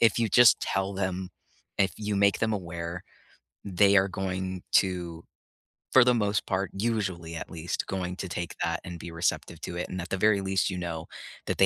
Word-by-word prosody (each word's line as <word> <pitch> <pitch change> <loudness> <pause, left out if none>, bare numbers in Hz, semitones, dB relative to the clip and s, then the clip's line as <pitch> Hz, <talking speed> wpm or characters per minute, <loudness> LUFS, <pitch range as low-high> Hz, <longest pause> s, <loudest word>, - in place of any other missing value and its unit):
if 115 -2 +4
you 115 - +2
just 120 +2 +7
tell 95 +1 -1
them, 95 -1 -2 0.5
if 95 - +3
you 105 -1 -2
make 100 0 +4
them 110 -1 +1
aware, 85 -2 -5 0.6
they 100 +1 +4
are 95 0 +4
going 95 -1 -3
to, 85 -3 +1 0.7
for 130 - +9
the 125 0 +4
most 105 -3 +1
part, 95 0 0
usually, 95 -6 -2
at - - -6
least, 85 0 -3
going 90 -1 -3
to 95 - -4
take 85 0 -4
that - - -1
and 85 -1 -7
be 85 - -7
receptive 85 +1 -2
to 85 - -5
it. 90 - -2
And 95 - -4
at 85 - -8
the 95 - -1
very 100 0 +3
least, 95 +1 +1
you 95 - -3
know 85 -2 -4 0.4
that - - -1
they 95 - +8
95 Hz, 200 wpm, -28 LUFS, 90-100 Hz, 0.7 s, for